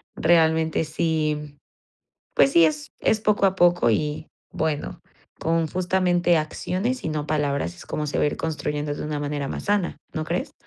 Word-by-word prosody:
realmente 160 -1 +3
sí, 150 -2 -1 0.8
pues 135 0 +4
sí, 170 - +7
es 150 -1 -3
es 220 - +2
poco 210 -2 +3
a 190 - +1
poco 175 -7 +4
y 150 +6 -1 0.2
bueno, 155 -2 -2 0.4
con 165 0 +1
justamente 180 -1 +2
acciones 185 +10 -2
y - - -1
no 150 -1 -3
palabras 150 +2 -1
es 175 - -13
como 150 0 -3
se 145 - -2
va - - +3
a - - +3
ir - - -4
construyendo 150 -2 -2
de - - -6
una 150 -1 -3
manera 145 -1 -3
más - - -5
sana, 205 -3 0 0.2
¿no 155 - -2
crees? 175 +2 -3
160 Hz, 175 wpm, -24 LUFS, 150-175 Hz, 0.8 s, sí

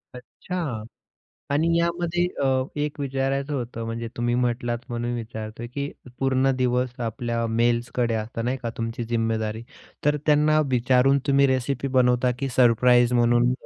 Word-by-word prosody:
अच्छा 125 +8 -8 1.0
आणि 150 +4 +2
यामध्ये 170 +1 0 0.2
अ, - - +2 0.3
एक 150 0 -3
विचारायचं 135 +1 -1
होतं, 120 -3 -4
म्हणजे 115 0 -4
तुम्ही 120 0 0
म्हटलात 120 -1 0
म्हणून 120 0 -3
विचारतोय, 110 0 -6
की 140 +4 -4 0.3
पूर्ण 135 0 +2
दिवस 125 0 +1
आपल्या 115 0 -2
मेल्सकडे 120 +1 0
असतं, 110 +1 -3
नाही 125 +2 0
का 115 - -2
तुमची 115 +1 -3
जिम्मेदारी. 110 -1 -1 0.4
तर 150 0 +3
त्यांना 155 0 +4
विचारून 125 +2 +3
तुम्ही 140 -1 +4
रेसिपी 130 +1 -1
बनवता 125 0 +3
की 135 - -2
सरप्राईज 120 0 +5
म्हणून 120 0 +3
125 Hz, 135 wpm, -24 LUFS, 115-135 Hz, 1.0 s, सरप्राईज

